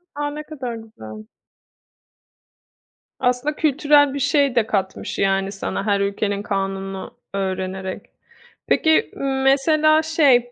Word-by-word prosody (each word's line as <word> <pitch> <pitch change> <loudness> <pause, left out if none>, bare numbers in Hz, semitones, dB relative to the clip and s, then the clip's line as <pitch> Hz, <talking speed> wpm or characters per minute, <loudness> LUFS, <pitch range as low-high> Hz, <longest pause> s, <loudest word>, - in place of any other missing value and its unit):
A! 290 0 -2
Ne 300 +1 -6
kadar 265 -6 -6
güzel. 110 - -11 1.9
Aslında 250 +4 0
kültürel 290 -2 +3
bir 280 - -3
şey 280 -1 +2
de 230 -2 +2
katmış, 190 -3 -3
yani 195 0 +1
sana 195 0 -4
her 200 -2 +2
ülkenin 200 0 -1
kanununu 195 -1 -4 0.2
öğrenerek. 190 -1 -3 0.6
Peki, 315 0 +3 0.3
mesela, 310 +3 +4
şey, 275 -7 +3
235 Hz, 110 wpm, -21 LUFS, 195-290 Hz, 1.9 s, mesela